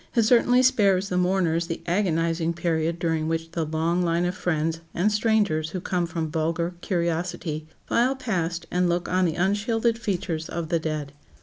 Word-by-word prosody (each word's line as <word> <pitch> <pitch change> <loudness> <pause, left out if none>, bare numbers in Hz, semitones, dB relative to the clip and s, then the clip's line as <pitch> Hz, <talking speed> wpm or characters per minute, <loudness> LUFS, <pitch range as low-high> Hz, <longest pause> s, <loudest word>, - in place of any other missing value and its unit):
It 230 - +4
certainly 245 +2 +4
spares 200 -6 +3
the 180 - -1
mourners 180 -2 +1
the 165 - -5
agonizing 170 -2 +1
period 165 -1 -1
during 160 -2 -1
which 165 0 -2
the 165 -1 -1
long 165 +3 0
line 170 0 +1
of 180 - 0
friends, 165 -2 -1 0.2
and 200 +5 +2
strangers 210 -8 +1
who 185 - -4
come 180 -1 -1
from 165 -2 -3
vulgar 165 +2 -1
curiosity, 170 -3 -2 0.2
file 250 +3 +2
past 175 -10 -2
and 180 0 +2
look 175 0 0
on 185 0 +2
the 165 -2 0
unshielded 225 +5 +1
features 175 -7 -2
of 165 -2 -4
the 170 -1 +2
dead. 155 -3 -4
170 Hz, 175 wpm, -25 LUFS, 165-195 Hz, 0.2 s, It